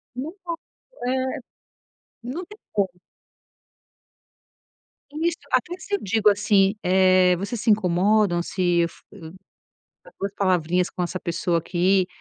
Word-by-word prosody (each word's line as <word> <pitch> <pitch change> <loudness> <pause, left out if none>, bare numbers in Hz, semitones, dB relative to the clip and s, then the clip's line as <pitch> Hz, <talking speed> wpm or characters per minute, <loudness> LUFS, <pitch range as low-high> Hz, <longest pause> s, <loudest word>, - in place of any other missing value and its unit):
Nem 280 +6 -4
posso, 335 -2 -5 0.5
eh, 260 +2 -1 0.9
não 305 +9 -5
tem 420 +3 -14
como. 190 -3 -1 2.1
Isso. 330 +3 -1
Até 350 - +1
se 405 - -2
eu - - -3
digo, 210 +1 +3
assim, 205 -1 +3
eh, 185 0 +4
vocês 205 +4 -4
se 230 - 0
incomodam 200 -1 +3
se 175 -1 0
eu 170 - +2 1.2
trocar - - -18
2 200 0 -3
palavrinhas 180 -2 +1
com 180 - -3
essa 185 +1 -3
pessoa 170 0 -1
aqui, 185 +2 +2
195 Hz, 125 wpm, -24 LUFS, 180-250 Hz, 2.1 s, eh